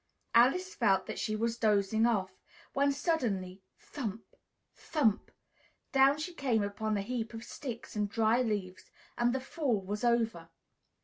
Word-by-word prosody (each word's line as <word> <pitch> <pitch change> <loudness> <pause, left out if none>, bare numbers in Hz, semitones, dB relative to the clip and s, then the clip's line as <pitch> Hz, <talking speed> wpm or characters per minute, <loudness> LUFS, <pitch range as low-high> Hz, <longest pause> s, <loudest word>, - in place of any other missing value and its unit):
Alice 275 +11 +4
felt 195 -6 +2
that - - -5
she 215 - -1
was 230 +2 -1
dozing 215 +1 +3
off, 195 -5 -1 0.3
when 280 +1 +3
suddenly, 215 - -1 0.2
thump! 225 -6 -7 0.4
thump! 245 -10 0 0.6
down 270 +1 +5
she 315 +4 -5
came 250 -9 +1
upon 210 +1 -2
a 200 - -2
heap 230 0 -4
of 225 - -7
sticks 240 -3 -7
and 210 -1 0
dry 225 +3 +2
leaves, 205 -6 -3 0.3
and 240 0 +2
the 265 - -1
fall 265 -4 -1
was 205 +3 -5
over. 225 -8 +1
225 Hz, 145 wpm, -31 LUFS, 205-260 Hz, 0.6 s, down